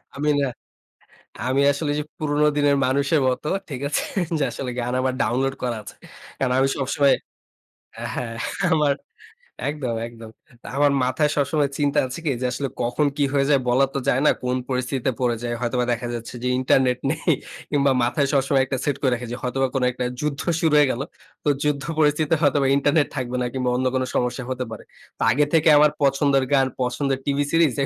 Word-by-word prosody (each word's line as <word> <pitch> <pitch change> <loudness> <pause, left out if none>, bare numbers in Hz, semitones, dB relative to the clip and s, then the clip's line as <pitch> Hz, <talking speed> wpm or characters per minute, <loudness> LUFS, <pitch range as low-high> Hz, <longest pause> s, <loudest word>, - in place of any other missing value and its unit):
আমি 150 +2 0
না, - - +2 1.0
আমি 130 +2 +2
আসলে 145 +1 -2
যে, - - 0 0.2
পুরনো 150 -2 +1
দিনের 145 -1 +3
মানুষের 140 +3 +2
মতো, 130 +4 -2 0.2
ঠিক 135 -5 -5
আছে? 145 - 0 0.4
যে, - - 0
আসলে 130 - -5
গান 120 +1 -2
আমার 130 0 0
ডাউনলোড 135 +4 0
করা 120 -2 -1
আছে। 100 - -11 0.4
কারণ 130 -2 0
আমি 135 +1 +3
সবসময় 140 +1 +2 1.0
হ্যাঁ। 115 -2 -4 0.4
আমার 150 -3 +3 0.8
একদম, 135 -6 -3
একদম। 115 -1 -11 0.5
আমার 145 0 +4
মাথায় 140 +4 +1
সবসময় 145 0 +1
চিন্তা 145 0 +2
আছে 130 +6 -6
কি 150 - +2
যে, - - 0
আসলে 135 +3 -2
কখন 125 +5 +1
কি 145 - +2
হয়ে 140 -1 +2
যায় 140 -2 +4
বলা 130 +3 +4
তো - - -2
যায় 130 - +3
না - - +6
কোন 125 0 0
পরিস্থিতিতে 130 0 -1
পড়ে 120 -2 +2
যায়। 120 0 -2
হয়তোবা 125 0 0
দেখা 120 0 -2
যাচ্ছে 115 +1 -7
যে, - - 0
ইন্টারনেট 130 -1 +2
নেই, 165 +2 0 0.4
কিংবা 140 -2 +3
মাথায় 140 +4 +1
সবসময় 135 0 +3
একটা 135 0 -2
সেট 145 - +1
করে 130 - +2
রেখেছি। 120 0 -4
হয়তোবা 135 +1 0
কোন 135 - +1
একটা 125 0 -3 0.2
যুদ্ধ 150 -2 -2 0.2
শুরু 160 -2 +2
হয়ে 145 -2 +5
গেল। 120 - -3 0.4
তো - - +2
যুদ্ধ 145 -2 0 0.2
পরিস্থিতিতে 150 +1 +3
হয়তোবা 145 -2 +3
ইন্টারনেট 145 +2 +2
থাকবে 125 -1 -2
না, - - 0
কিংবা 130 -1 -1
অন্য 130 +1 0
কোন 130 - +1
সমস্যা 125 +1 -1
হতে 130 0 -2
পারে। - - -8 0.3
তো - - -12
আগে 145 +5 +3
থেকে 160 -1 +5
আমার 150 0 +5
পছন্দের 140 0 +3
গান 135 -1 +4
পছন্দের 130 +2 -1
টিভি 145 0 +1
সিরিজ 165 -3 +4
135 Hz, 185 wpm, -23 LUFS, 125-145 Hz, 1.0 s, না